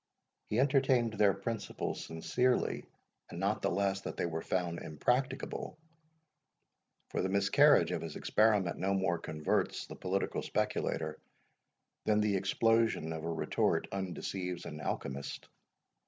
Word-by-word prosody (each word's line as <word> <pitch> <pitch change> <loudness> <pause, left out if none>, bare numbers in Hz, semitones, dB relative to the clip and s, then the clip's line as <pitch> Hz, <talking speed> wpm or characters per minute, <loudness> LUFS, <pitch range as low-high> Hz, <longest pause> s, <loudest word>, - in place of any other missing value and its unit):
He 110 - 0
entertained 130 -4 +3
their 100 -2 +4
principles 110 +3 -4
sincerely 125 +10 0 0.4
and 85 - -7
not 100 +4 0
the - - +1
less 95 -1 0
that - - -6
they - - 0
were 80 -1 -2
found 85 -2 -1
impracticable; 130 - -1 1.3
for - - -1
the 95 - 0
miscarriage 100 0 +5
of - - -1
his - - -6
experiment 105 -5 +2
no 95 +2 +1
more 95 -3 +1
converts 75 -1 -1
the - - -9
political 95 +1 -1
speculator, 80 0 -1 0.9
than 105 -1 +3
the 105 -1 +2
explosion 110 -3 +2
of 80 -1 -6
a 85 - -2
retort 80 - +1
undeceives 90 -1 -4
an 75 - -6
alchymist. 70 -1 -4
95 Hz, 130 wpm, -33 LUFS, 85-110 Hz, 1.3 s, miscarriage